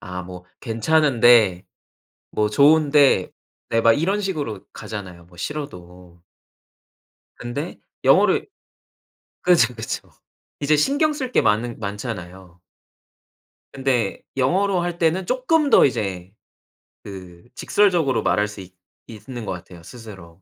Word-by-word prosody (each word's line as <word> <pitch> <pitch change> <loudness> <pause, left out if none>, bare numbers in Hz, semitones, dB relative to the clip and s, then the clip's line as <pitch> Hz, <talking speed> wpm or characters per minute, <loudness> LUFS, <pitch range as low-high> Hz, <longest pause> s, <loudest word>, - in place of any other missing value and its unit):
아 90 -3 -7
뭐 90 0 -10 0.2
"괜찮은데. 115 - +3 0.7
뭐 105 0 0
좋은데." 145 -5 +4 0.4
네 115 0 +1
막 115 0 +5
이런 195 - 0
식으로 150 - -3
가잖아요, 90 -5 -8
뭐 90 0 -20
싫어도. 90 - -8 1.2
근데 140 +8 -6 0.2
영어를 - - +4 0.9
그쵸, 145 -10 +3
그쵸. 110 -1 -6 0.5
이제 150 +2 +2
신경 285 - +1
쓸 260 -4 -5
게 - - +3
많은 115 +3 0
많잖아요. 95 -4 -7 1.1
근데 130 -6 -1 0.2
영어로 185 +7 +1
할 175 0 -3
때는 175 +2 +1
쪼끔 280 - +1
더 - - +6
이제 95 -8 -3 0.7
그 90 -3 -11
직설적으로 175 -10 +1
말할 105 0 +1
수 105 -1 -10
있 90 0 -14 0.3
있는 120 +1 -9
것 95 - -4
같아요 85 -1 -10
스스로. 95 -7 -13
115 Hz, 230 characters per minute, -21 LUFS, 95-155 Hz, 1.2 s, 더